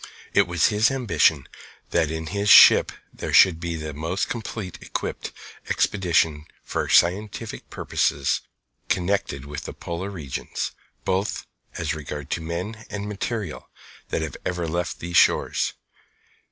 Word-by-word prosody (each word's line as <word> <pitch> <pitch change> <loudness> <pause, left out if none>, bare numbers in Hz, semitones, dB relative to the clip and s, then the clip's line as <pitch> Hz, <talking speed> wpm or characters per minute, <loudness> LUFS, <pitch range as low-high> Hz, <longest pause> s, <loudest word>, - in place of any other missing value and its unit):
It - - +4
was 85 -2 +3
his 105 +1 +3
ambition 85 - +2 0.4
that 80 - +2
in 80 0 -4
his 100 0 0
ship - - +9 0.2
there - - -5
should 90 -4 +6
be 85 0 -3
the 75 -1 -5
most 80 +7 -2
completely 110 -5 -6
equipped - - -4 0.4
expedition 80 -5 +1 0.2
for - - -3
scientific 105 +5 +1
purposes - - 0 0.5
connected 90 -7 -1
with 75 0 -7
the - - -6
polar 85 +3 -5
regions, 80 -10 -4 0.3
both 95 +2 -1 0.3
as 80 -4 -1
regards 75 -1 -4
men 90 +7 -5
and 105 0 -4
material, 105 -3 -4 0.4
that 80 -3 -2
ever 90 -1 -2
left 85 +2 -2
these 85 +1 -1
shores. - - +3
85 Hz, 125 wpm, -24 LUFS, 80-100 Hz, 0.5 s, ship